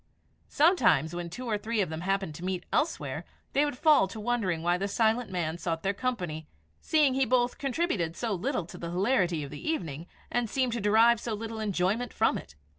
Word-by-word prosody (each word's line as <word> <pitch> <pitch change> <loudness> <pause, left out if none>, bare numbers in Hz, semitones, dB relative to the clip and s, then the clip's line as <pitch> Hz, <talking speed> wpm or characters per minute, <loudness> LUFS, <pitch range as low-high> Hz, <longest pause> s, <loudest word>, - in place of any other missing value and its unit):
Sometimes, 235 - +3
when 175 0 -4
two 250 +9 -7
or 215 -3 -1
three 225 +1 -2
of 190 - +1
them 160 +1 -4
happened 195 -2 -1
to 170 - -9
meet 185 -1 -3
elsewhere, 310 +2 -1 0.3
they 285 +2 +4
would 290 -4 -3
fall 295 -7 +5
to 215 +4 -8
wondering 210 -8 -1
why 175 +1 +3
the 195 +2 -1
silent 225 +2 +1
man 170 -3 -2
sought 165 -2 -2
their 195 - +1
company, 180 -10 -3 0.3
seeing 300 -4 +3
he 270 +1 +2
both 245 0 +1
contributed 255 - -1
so 230 +1 -2
little 215 - -1
to - - -11
the 170 - -5
hilarity 180 - +1
of 140 - -8
the 145 - -8
evening, 165 - -3 0.2
and 240 -2 0
seemed 255 0 0
to 235 - -2
derive 220 +3 +5
so 225 -1 -3
little 225 +1 -6
enjoyment 210 +3 0
from - - +2
it. 70 - -14
210 Hz, 205 wpm, -29 LUFS, 175-245 Hz, 0.3 s, fall